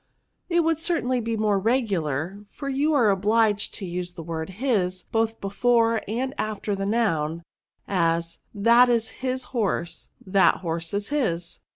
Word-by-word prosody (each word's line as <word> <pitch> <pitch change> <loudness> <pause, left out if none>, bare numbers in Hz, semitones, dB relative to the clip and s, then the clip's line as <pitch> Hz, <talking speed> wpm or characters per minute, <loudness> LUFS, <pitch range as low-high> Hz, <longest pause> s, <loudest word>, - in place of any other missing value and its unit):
" - - -50
It 345 -1 +3
would 325 -1 +1
certainly 255 -8 0
be 230 0 -2
more 210 -2 +2
regular; 195 - -1
for 280 - -8
you 280 +3 +1
are 230 -7 +4
obliged 210 +1 +1
to 195 - -5
use 175 0 -4
the 170 -2 -8
word 160 0 -4
Awj 195 -8 0
both 225 0 0
before 230 +3 +2
and 255 +6 -2
after 215 -1 -2
the 195 0 -3
noun; 170 -8 0 0.4
as, 170 -2 0
that 235 +4 +5
is 230 -2 +1
his 255 0 -1
horse, 180 -7 -2 0.2
that 190 -1 +3
horse 165 +1 -3
is 205 0 -2
his.' 175 - -1
210 Hz, 160 wpm, -25 LUFS, 180-240 Hz, 0.4 s, that